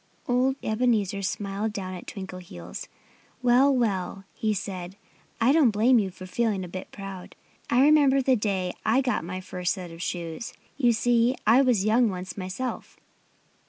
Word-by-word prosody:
Old 255 +2 +2
Ebenezer 215 -3 +1
smiled 200 +2 -2
down 185 -2 -5
at 180 - -9
Twinkleheels. 180 - -8 0.6
"Well, 250 +3 +5
well!" 195 -7 -1
he 220 - -1
said. 190 -2 -4 0.4
"I 235 +3 +4
don't 295 -4 +5
blame 225 +4 +4
you 200 -3 -1
for 185 0 -11
feeling 205 0 -1
a - - -6
bit 185 +2 -7
proud. 195 -2 -8 0.3
I 245 - +4
remember 285 -2 +5
the 260 -1 +3
day 195 -5 -1
I 235 +5 +3
got 255 -8 -1
my 185 +2 -5
first 180 -1 -2
set 180 -3 -8
of 165 +1 -10
shoes. 170 +4 -4 0.2
You 245 -4 +3
see, 240 +2 +2
I 230 +5 +6
was 240 -7 +2
young 225 +2 +4
once 185 -1 -6
myself." 190 +7 -5
210 Hz, 160 wpm, -26 LUFS, 185-245 Hz, 0.6 s, I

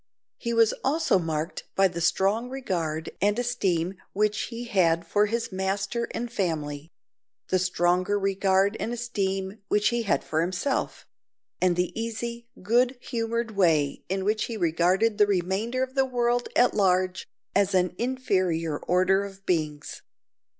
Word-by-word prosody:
He 235 - -3
was 230 -1 +4
also 275 - +2
marked 160 0 -3
by 195 0 +5
the 170 -2 -5
strong 200 +7 +1
regard 170 -12 -3
and 205 +2 +2
esteem 195 -8 0 0.2
which 210 +1 +1
he 235 0 -6
had 170 -7 +2
for 205 +5 +2
his 230 +1 -2
master 195 +5 -2
and 240 0 -4
family; 155 -6 -2 0.6
the 185 - +2
stronger 180 +2 +1
regard 195 0 +2
and 230 - -2
esteem 195 -4 -2
which 210 +1 +3
he 235 0 0
had 215 - 0
for 160 +1 0
himself; 185 +11 -2 0.6
and 180 -1 +3
the 180 0 0
easy, 235 +1 -4 0.2
good 245 +5 +2
humoured 230 -1 -2
way 160 -8 +2
in 190 0 -1
which 215 +1 +1
he 230 - -5
regarded 185 +5 +2
the 210 - +6
remainder 200 +7 0
of 260 0 -5
the 270 -1 +3
world 245 -1 0
at 245 - +4
large 185 -2 +1 0.3
as 200 -1 +2
an 180 -1 +2
inferior 185 - 0
order 185 +2 +2
of 195 -1 -10
beings. 155 -4 -2
195 Hz, 150 wpm, -26 LUFS, 180-230 Hz, 0.6 s, the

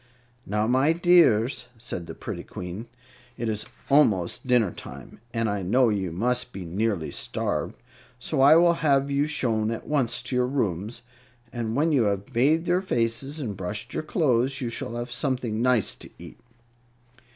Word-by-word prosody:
"Now, 105 +2 0
my 130 +7 +3
dears," 135 -9 +4
said 90 -6 -6
the - - -7
pretty - - -6
Queen, 90 +6 -7 0.5
"it 120 - -3
is 110 -1 -3 0.2
almost 115 - +2
dinner 120 -7 +3
time, - - -11
and 115 -1 0
I 100 -1 -1
know 120 +7 +3
you 95 -5 -1
must 125 +7 -1
be 95 -2 -6
nearly 95 -1 -1
starved; - - -2 0.4
so 125 +2 -1
I 145 +3 +8
will 170 +1 +6
have 140 -2 +2
you 140 +1 +1
shown 115 -7 0
at 115 - -4
once 130 -5 0
to 125 - -4
your 125 0 +2
rooms, 115 -3 -2 0.5
and 115 -2 -3
when 155 +4 +2
you 130 -7 +3
have 100 +4 -2
bathed 150 +8 +3
your 175 +1 +2
faces 130 -1 -1
and 115 -8 -4
brushed 105 +6 -5
your - - -1
clothes 135 -5 +1
you 125 -4 -2
shall 115 0 -5
have 120 +1 -5
something 120 -4 -1
nice 125 -4 +2
to - - -9
eat." - - -12
120 Hz, 170 wpm, -25 LUFS, 110-135 Hz, 0.5 s, I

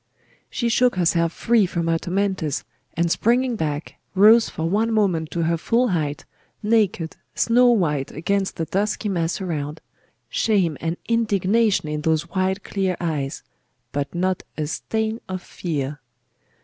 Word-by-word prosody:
She 240 - -1
shook 245 +1 +3
herself 170 -2 +2
free 225 +1 +2
from 170 -1 -2
her 165 0 +2
tormentors, 185 -5 -1 0.3
and 170 0 +1
springing 245 +4 +2
back, 150 -5 -3 0.2
rose 220 +4 +7
for 160 - -3
one 215 +6 +1
moment 185 -8 +1
to 170 - -1
her 165 +1 +1
full 240 +8 +1
height, 150 -5 -2 0.4
naked, 205 -7 +1 0.2
snow 245 +1 +4
white 150 - +1
against 195 +5 -1
the 165 - -2
dusky 205 +4 -1
mass 170 -3 -1
around 155 -5 -3 0.5
shame 190 -8 +1
and 165 +1 -2
indignation 215 -4 +2
in 150 0 -3
those 160 +1 +1
wide 190 0 0
clear 190 -2 -1
eyes, 150 -5 -2 0.5
but 140 +4 -3
not 185 +1 0 0.2
a 155 - -1
stain 220 +8 -2
of 185 -1 -4
fear. 150 -4 -4
180 Hz, 145 wpm, -23 LUFS, 160-215 Hz, 0.5 s, rose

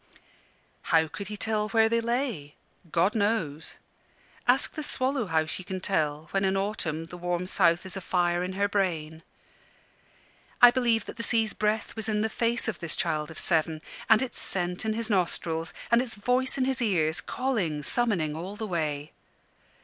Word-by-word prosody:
How 160 -1 +3
could 200 +5 -7
he 210 0 -5
tell 215 0 -1
where 225 0 +4
they 230 +1 +1
lay? 235 - -2 0.4
God 175 +4 +3
knows. 200 -9 -1 0.7
Ask - - +3
the 310 - -4
swallow 265 -4 -1
how 160 -2 +2
she 170 +4 -5
can 185 +1 -4
tell, 155 -5 -1
when 195 0 +1
in 190 0 +2
autumn 175 -6 -2
the 175 +2 -10
warm 175 0 -1
south 170 -1 +3
is 190 - -3
a 195 - -4
fire 175 -1 +1
in 185 +1 -3
her 200 +1 +1
brain. 165 -6 -1 1.4
I 245 0 +10
believe 240 -3 +1
that - - -9
the - - -3
sea's 225 -2 +1
breath 215 +1 -1
was 220 0 0
in 210 -1 +1
the 220 - +1
face 235 +2 0
of 215 -5 -2
this 170 -2 -2
child 150 -1 -1
of 160 - -10
seven, 160 -2 +1 0.3
and 220 +2 +6
its 260 - -6
scent 180 +1 -2
in 220 - +1
his 225 0 -2
nostrils, 170 -3 0 0.2
and 235 +1 +6
its 245 -3 -3
voice 250 +5 +1
in 260 - +2
his 265 -1 -1
ears, 165 -8 +1
calling, 200 - -1
summoning 195 - 0
all 180 +5 -6
the 220 +1 -4
way. 155 -5 -2
195 Hz, 180 wpm, -28 LUFS, 165-225 Hz, 1.4 s, I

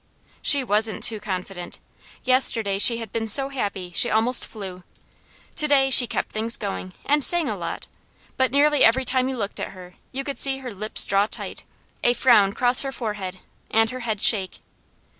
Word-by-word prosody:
She 285 -2 +3
wasn't 215 -1 -1
too 220 -2 -1
confident. 185 -3 -8 0.4
Yesterday 230 -6 +3
she 230 +3 +4
had 225 -3 -9
been 225 -1 -4
so 270 +6 +5
happy 200 -9 -6
she - - +3
almost 230 +3 +1
flew. 190 -4 -11 0.7
To 300 - +4
day 270 -2 +1
she 250 -1 +7
kept - - -5
things 225 +2 -2
going, 195 -2 -7
and 295 0 0
sang 345 +2 +2
a - - -4
lot, - - -7 0.5
but 260 -2 -1
nearly 290 0 +2
every 255 +4 +2
time 255 +1 0
you 265 - -6
looked 200 -3 -6
at - - -7
her 180 -1 -14 0.2
you 270 +1 -6
could 280 0 -7
see 270 -1 +3
her 260 -2 -9
lips 215 +2 +2
draw 200 +1 0
tight, - - -7 0.4
a 240 - +2
frown 210 -7 +2
cross 245 +2 +6
her 270 - -5
forehead, 205 -7 -7 0.3
and 225 0 0
her 255 - -8
head 220 -4 -5
shake. 195 -5 +2
225 Hz, 185 wpm, -21 LUFS, 200-260 Hz, 0.7 s, she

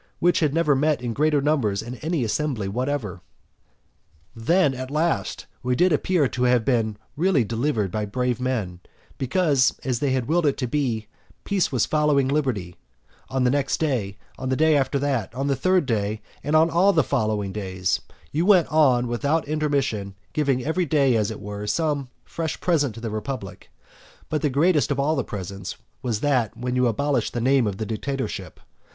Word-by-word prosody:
which 175 +1 +3
had 155 -3 +2
never 150 -2 +2
met 150 +2 +2
in 120 -2 -3
greater 150 +2 +2
numbers 130 -9 +1
in 120 +2 -6
any 160 -1 -1
assembly 120 -2 -1
whatever. 115 -4 -3 1.1
Then, 145 +6 +2
at 130 0 -6
last, 160 +4 -1 0.2
we 125 0 0
did 180 +4 +3
appear 155 -1 +2
to 125 - -4
have 125 -2 +3
been 115 -5 +1 0.2
really 165 -4 +2
delivered 115 -3 -1
by 105 +1 -2
brave 125 +3 -1
men, 110 -9 -2 0.4
because, 140 -1 +2
as 125 -3 -1
they 145 - 0
had 130 -2 0
willed 165 +1 +2
it 140 - +1
to 130 - -1
be, 125 -5 -1 0.4
peace 195 -4 0
was 125 -5 +2
following 150 -3 +2
liberty 130 - -1 0.5
On 130 -1 0
the 125 - +3
next 140 -1 0
day, 120 -11 -1 0.2
on 130 - -3
the 130 - +1
day 155 +2 +4
after 140 0 +1
that, 135 -4 -1
on 135 +2 -2
the 140 -1 +1
third 185 +5 +2
day, 110 -3 -1 0.2
and 150 - 0
on 160 +1 +5
all 190 +4 +4
the 160 - +4
following 110 -7 -1
days, 95 -3 -1 0.3
you 155 +3 0
went 185 -4 +5
on 130 -6 +3
without 140 +7 0
intermission 140 -10 -1 0.2
giving 135 -4 0
every 170 +3 0
day, 140 -4 +3
as 105 -2 +1
it 110 - -6
were, 105 0 -6
some 145 +2 0 0.2
fresh 165 -2 -4
present 145 -10 +1
to 115 - -9
the 115 -2 -4
republic, 105 -4 -6 0.6
but 155 - -1
the 150 - +1
greatest 150 +3 +2
of 140 -1 -1
all 150 +3 +1
presents 95 -1 -6 0.3
was 120 -5 -2
that, 130 -7 +1
when 125 +1 -2
you 125 -1 +3
abolished 135 +1 0
the 120 - -1
name 130 -1 +3
of 100 -2 -3
the 110 - -3
dictatorship. 110 - -4
130 Hz, 185 wpm, -24 LUFS, 110-150 Hz, 1.1 s, on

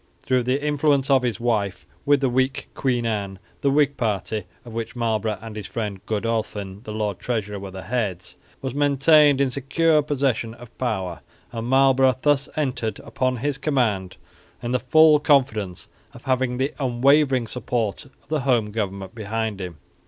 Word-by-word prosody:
Through 130 -1 +2
the 135 +4 0
influence 145 -2 +2
of 135 -1 +5
his 120 -3 -2
wife 110 -5 -1 0.2
with 145 -1 +4
the 135 - +3
weak 130 +2 0
Queen 125 -3 0
Anne, 100 -4 -2 0.2
the 140 - +2
Whig 145 0 +2
party, 105 -2 -1 0.2
of 115 - -10
which 115 +1 -4
Marlborough 110 -3 -1
and 110 -1 -8
his' 105 -2 -6
friend 105 -4 -4
Godolphin 105 -3 -2
the 110 - -6
lord 105 -3 -2
treasurer 105 -4 -3
were 100 0 -7
the 95 0 -8
heads, 100 -4 -3 0.3
was 130 -2 -3
maintained 145 0 +5
in 135 -2 +2
secure 150 +4 +2
possession 135 -6 -1
of 120 -1 -14
power; 95 -9 -2 0.3
and 115 0 -4
Marlborough 130 -1 +4
thus 145 0 +2
entered 125 -8 -1
upon 130 -1 -1
his 140 +3 -2
command 115 -11 0 0.5
in 120 - -2
the 125 - +2
full 155 +4 +6
confidence 125 - +1 0.3
of 120 - -12
having 130 -2 0
the 135 +2 -1
unwavering 135 0 +3
support 115 -3 -2
of - - -24
the 155 -1 0
home 120 -6 +1
government 100 -2 -4
behind 110 -2 -3
him. 90 -4 -6
120 Hz, 165 wpm, -23 LUFS, 105-135 Hz, 0.5 s, full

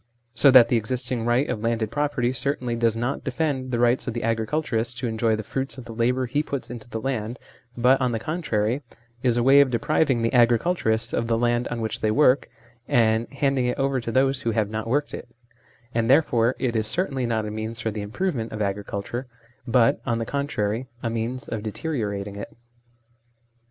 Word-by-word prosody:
So 140 +4 +5
that 125 -3 +8
the 120 - +3
existing 120 +1 -2
right 120 +4 +2
of 115 -4 -3
landed 115 -1 -1
property 140 -4 0
certainly 130 -3 0
does 115 -1 +1
not 120 +4 -2
defend 130 -1 -2
the 120 - -1
rights 120 +2 +2
of 120 - -3
the 120 - -3
agriculturist 115 +1 -1
to 125 - -2
enjoy 110 0 +1
the 110 - -5
fruits 135 +6 -4
of 130 - -9
the 115 - -8
labour 125 +3 +1
he 135 +5 0
puts 140 -5 -5
into 120 -1 -9
the 115 - -4
land, 120 -1 -3 0.4
but, 130 +3 +4
on 125 -1 +1
the 115 - -1
con 155 +10 -4
trary, 110 -4 0
it 135 -5 -17 0.3
is 120 -2 +2
a 120 - +2
way 135 +2 +7
of 140 - +3
depriving 125 +1 +1
the 115 - 0
agriculturists 120 -1 +2
of 115 - 0
the 115 -1 +1
land 120 +1 +1
on 120 -1 -4
which 110 -1 -3
they 110 - +2
work, 130 +3 +3 0.4
and 115 -1 +2
handing 135 -2 +1
it 125 - -1
over 135 -1 0
to 115 - -4
those 135 +2 +2
who 115 - -1
have 110 -2 0
not 110 +1 -3
worked 145 +5 0
it; - - -7 0.7
and 115 0 0
there 145 +5 +6
fore 120 -2 +1
it 120 -3 -1
is 110 -1 +1
certainly 135 - 0
not 110 -2 -1
a 105 - -4
means 110 +1 -5
for 115 -3 -2
the 105 0 -5
improve 150 - -2
ment 115 -3 -4
of 110 - -5
agriculture, 100 +4 -3 0.4
but, 120 -1 +3
on 115 -2 -1
the 115 - -2
contrary, 125 -4 -2 0.2
a 115 - -1
means 115 +3 -3
of 110 - -4
deteriorating 105 -5 -3
it. 100 - -8
120 Hz, 215 wpm, -24 LUFS, 110-130 Hz, 0.7 s, that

